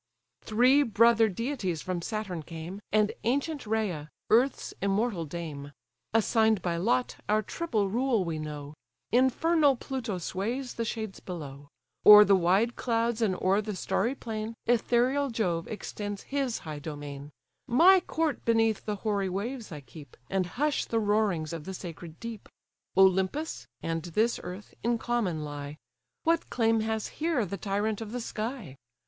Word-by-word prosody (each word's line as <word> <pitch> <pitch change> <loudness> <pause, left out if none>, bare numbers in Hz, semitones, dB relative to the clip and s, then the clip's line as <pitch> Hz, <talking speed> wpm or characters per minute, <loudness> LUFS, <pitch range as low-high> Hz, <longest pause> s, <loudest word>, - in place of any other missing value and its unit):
Three 250 +6 +4
brother 230 -2 +4
deities 200 - -3
from 185 -2 -2
Saturn 195 -4 -3
came, 165 +5 -8
And 215 0 +3
ancient 280 +2 -1
Rhea, 200 -9 -1 0.2
earth's 250 +5 +3
immortal 200 -2 0
dame: 145 -3 -6 0.4
Assign'd 220 -2 +3
by 170 -2 0
lot, 240 +7 +1
our 215 +1 +3
triple 220 -6 -1
rule 235 -1 +1
we 160 -2 -3
know; 150 -1 -6 0.4
Infernal 280 +4 +4
Pluto 245 -5 -4
sways 225 +9 -3
the 230 - -3
shades 220 -3 -4
below; 145 -6 -8 0.4
O'er 210 0 +11
the 200 - +5
wide 190 +7 +2
clouds, 230 -1 0
and 200 -5 +2
o'er 195 +3 +2
the 210 -1 -4
starry 230 +7 0
plain, 220 -2 -5
Ethereal 245 +4 +2
Jove 180 -8 -1
extends 205 -1 -5
his 275 -4 -1
high 155 -2 -5
domain; 145 -1 -7 0.4
My 355 +10 +7
court 320 -5 -2
beneath 225 -2 +2
the 210 - -1
hoary 200 -3 +1
waves 220 +4 -4
I 150 -2 -7
keep, 135 +1 -13
And 190 -2 +1
hush 295 +1 +1
the 230 - -1
roarings 205 -7 +1
of 165 -2 -6
the 190 0 -5
sacred 165 -2 -9
deep; 230 -2 -7 0.5
Olympus, 190 - +2 0.2
and 165 0 -1
this 215 +8 0
earth, 180 +3 -8
in 235 +1 +1
common 220 -10 -1
lie: 145 0 -6 0.5
What 330 0 +1
claim 225 -2 +2
has 220 0 -1
here 315 -8 +1
the 200 +2 -5
tyrant 205 +2 -1
of 215 -1 -6
the 245 - -2
sky? 220 - -5
215 Hz, 150 wpm, -29 LUFS, 175-235 Hz, 0.5 s, O'er